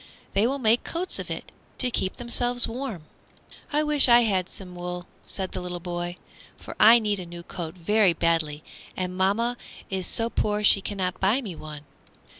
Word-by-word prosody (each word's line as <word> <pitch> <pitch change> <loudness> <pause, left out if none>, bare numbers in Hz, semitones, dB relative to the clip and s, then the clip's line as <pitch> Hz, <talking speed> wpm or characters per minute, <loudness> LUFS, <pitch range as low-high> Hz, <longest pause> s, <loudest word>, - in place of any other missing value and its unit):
"They 205 +4 +3
will 275 +2 -1
make 230 -2 +2
coats 360 +2 0
of - - -6
it, - - -6 0.3
to 250 -1 0
keep 190 -4 -1
themselves 245 0 +2
warm." 230 - -5 0.7
"I 300 +1 +2
wish 300 -3 +4
I 240 0 +7
had 190 -5 0
some 185 -2 -8
wool," 180 0 -5 0.2
said 190 -2 -5
the 180 -1 -5
boy, 175 0 -5 0.4
"for - - -10
I 225 +3 +9
need 210 -3 -1
a 180 - -6
new 170 0 -9
coat 170 -1 -7
very 195 +1 +3
badly, 160 -3 0 0.3
and 185 -1 -3
mamma 215 +6 +1 0.3
is 190 -1 -1
so 230 0 +2
poor 210 0 -1
she 200 -1 +6
cannot 185 -3 -3
buy 200 +7 +2
me 205 -10 -6
one." 150 -2 -9
195 Hz, 180 wpm, -25 LUFS, 180-235 Hz, 0.7 s, I